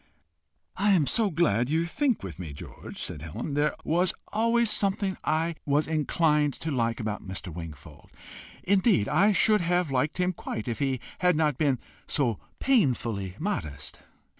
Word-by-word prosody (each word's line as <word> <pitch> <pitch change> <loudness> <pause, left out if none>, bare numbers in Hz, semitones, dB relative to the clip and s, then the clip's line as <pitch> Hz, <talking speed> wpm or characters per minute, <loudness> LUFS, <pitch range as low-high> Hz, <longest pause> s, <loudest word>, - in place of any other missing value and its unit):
"I 205 0 +4
am 165 -6 +4
so 210 - +2
glad 145 - +2
you 160 +2 +1
think 260 - 0
with 90 -6 -7
me, 80 -5 -6
George!" 70 - -10
said 75 - -4
Helen. 80 - -5
"There 145 +1 +1
was 175 +3 +1 0.2
always 230 +1 +2
something 195 -1 +1
I 160 +2 +1
was 145 +1 +2
inclined 150 -2 +1
to 160 - -2
like 115 -3 0
about 105 -2 -3
Mr. 95 -2 -4
Wingfold. 75 -2 -10 0.5
Indeed 190 - +3
I 205 +3 +4
should 210 +1 +4
have 175 -2 +1
liked 135 +3 0
him 180 0 +1
quite 110 -8 -5
if 115 - -3
he 135 -3 0 0.2
had 180 -2 +3
not 150 -4 +1
been 140 -4 +2 0.3
so 120 -8 +1 0.2
painfully 120 - +1
modest." 75 - -4
150 Hz, 160 wpm, -27 LUFS, 115-180 Hz, 0.5 s, I